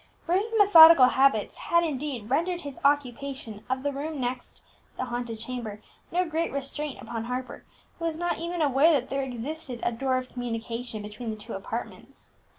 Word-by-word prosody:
Bruce's 405 Hz, +6 st, +1 dB
methodical 335 Hz, -9 st, +9 dB
habits 265 Hz, -6 st, +2 dB
had, 340 Hz, 0 st, +2 dB
indeed, 280 Hz, -7 st, -3 dB
rendered 340 Hz, +7 st, 0 dB
his 285 Hz, -2 st, -8 dB
occupation 275 Hz, -5 st, -1 dB
of 260 Hz, +1 st, -1 dB
the 285 Hz, -, 0 dB
room 295 Hz, +2 st, -4 dB
next 250 Hz, 0 st, -5 dB, 0.3 s
the -, -, -2 dB
haunted 240 Hz, -2 st, -4 dB
chamber 225 Hz, -2 st, -6 dB, 0.3 s
no 360 Hz, +1 st, +1 dB
great 325 Hz, +1 st, -1 dB
restraint 280 Hz, +1 st, -4 dB
upon 225 Hz, 0 st, -5 dB
Harper, 250 Hz, +1 st, -5 dB, 0.4 s
who 335 Hz, -, -3 dB
was 325 Hz, -1 st, -1 dB
not 350 Hz, 0 st, -1 dB
even 340 Hz, 0 st, -2 dB
aware 290 Hz, +3 st, +4 dB
that 265 Hz, -4 st, 0 dB
there 275 Hz, 0 st, -1 dB
existed 260 Hz, +1 st, -5 dB
a -, -, +1 dB
door 255 Hz, +2 st, 0 dB
of 255 Hz, 0 st, -4 dB
communication 230 Hz, -2 st, -5 dB
between 215 Hz, +3 st, -7 dB
the 220 Hz, -, -3 dB
two 215 Hz, +2 st, -8 dB
apartments. 220 Hz, +4 st, -7 dB
265 Hz, 170 wpm, -27 LUFS, 240-315 Hz, 0.4 s, methodical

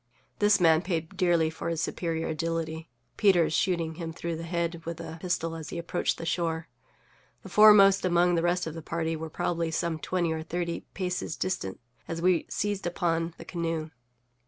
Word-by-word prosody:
This 205 Hz, 0 st, +4 dB
man 165 Hz, -2 st, +5 dB
paid 165 Hz, -3 st, -3 dB
dearly 170 Hz, -3 st, +2 dB
for 160 Hz, -, -4 dB
his 165 Hz, -1 st, -2 dB
superior 165 Hz, 0 st, -2 dB
agility, 160 Hz, 0 st, -3 dB, 0.3 s
Peters 180 Hz, -6 st, +4 dB
shooting 170 Hz, -3 st, +1 dB
him 165 Hz, -1 st, -4 dB
through 170 Hz, 0 st, -4 dB
the 160 Hz, -, -6 dB
head 170 Hz, 0 st, -2 dB
with 165 Hz, 0 st, -5 dB
a 165 Hz, -1 st, -7 dB
pistol 165 Hz, -2 st, -1 dB
as 160 Hz, -2 st, -7 dB
he -, -, -5 dB
approached 170 Hz, +1 st, -1 dB
the 165 Hz, -, -6 dB
shore. 165 Hz, -1 st, -1 dB, 0.8 s
The -, -, -9 dB
foremost 200 Hz, -2 st, +7 dB
among 175 Hz, 0 st, +3 dB
the 170 Hz, -, +2 dB
rest 175 Hz, +1 st, +1 dB
of 160 Hz, -, -5 dB
his 165 Hz, -1 st, -8 dB
party 165 Hz, 0 st, -2 dB
were 160 Hz, 0 st, -5 dB
probably 165 Hz, +1 st, -1 dB
some 160 Hz, 0 st, -1 dB
twenty 175 Hz, -2 st, 0 dB
or 160 Hz, -, -3 dB
thirty 170 Hz, +1 st, -4 dB
paces 180 Hz, -3 st, -2 dB
distant 135 Hz, -, -3 dB, 0.3 s
as 165 Hz, -, -4 dB
we 180 Hz, 0 st, +2 dB
seized 205 Hz, -3 st, -2 dB
upon 165 Hz, -1 st, -1 dB
the -, -, -10 dB
canoe. 165 Hz, -2 st, -3 dB
170 Hz, 180 wpm, -28 LUFS, 160-175 Hz, 0.8 s, foremost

